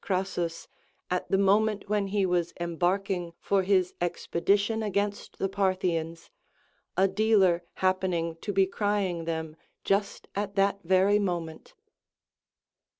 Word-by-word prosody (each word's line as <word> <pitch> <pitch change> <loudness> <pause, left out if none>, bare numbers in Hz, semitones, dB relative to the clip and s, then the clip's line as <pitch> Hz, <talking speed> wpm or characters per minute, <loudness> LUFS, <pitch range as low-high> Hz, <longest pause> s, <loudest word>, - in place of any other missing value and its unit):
Crassus 185 -3 -2 0.4
at 180 - -1
the 195 - +3
moment 205 +2 +2
when 205 -1 0
he 200 0 +1
was 175 -2 0
embarking96 175 +1 -1
for 200 -1 +1
his 185 -1 +2
expedition 200 +5 0
against 205 -1 -2
the 195 - 0
Parthians, 185 - -1 0.7
a 190 +1 +5
dealer 195 -3 +3
happening 185 -3 0
to 205 - -4
be 195 -1 +4
crying 195 -4 -1
them 160 -1 -3 0.3
just 200 +1 -1
at 200 0 -3
that 200 0 +2
very 190 +4 +4
moment. 170 -5 -4
190 Hz, 120 wpm, -28 LUFS, 175-200 Hz, 0.7 s, a